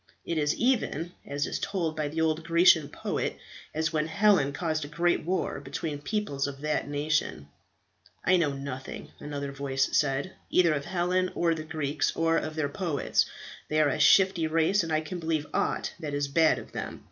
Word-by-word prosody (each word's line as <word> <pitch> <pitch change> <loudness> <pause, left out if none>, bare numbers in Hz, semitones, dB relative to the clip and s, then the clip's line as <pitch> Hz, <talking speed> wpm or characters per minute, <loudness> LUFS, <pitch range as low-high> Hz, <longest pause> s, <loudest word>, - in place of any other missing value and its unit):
It 165 -2 -1
is 150 0 +1
even, 230 - 0 0.2
as 145 0 -1
is - - -3
told 175 -6 -2
by 155 -1 -1
the 160 +3 -2
old 160 0 +1
Grecian 165 -3 +5
poet, - - -3 0.3
as 155 +1 -1
when 155 0 +1
Helen 195 -5 +3
caused 155 +1 -2
a - - -5
great 170 +4 +1
war 180 -4 -1
between 145 +2 -5
peoples 145 -6 -1
of 140 -1 -7
that 150 -1 -1
nation." 145 - -1 0.8
"I 185 +1 +5
know 160 -5 +2
nothing," 135 -1 -7
another 140 -1 -5
voice 135 -1 -1
said, 140 +5 +1 0.2
"either 170 -3 +4
of 140 -2 -3
Helen 185 0 0
or 170 -1 +2
the 160 - -4
Greeks, 155 -2 -1
or 165 0 +2
of 155 0 -3
their 155 -2 0
poets. 155 0 0 0.4
They 155 - +1
are 150 -2 +4
a - - -2
shifty 185 -4 +5
race, 165 +5 +2
and 165 -1 -4
I 155 0 +2
can 165 +3 -6
believe 160 -2 -1
aught - - -1
that 150 -4 -4
is 145 0 0
bad 160 +3 +4
of - - -9
them. - - -5
155 Hz, 190 wpm, -28 LUFS, 145-170 Hz, 0.8 s, Grecian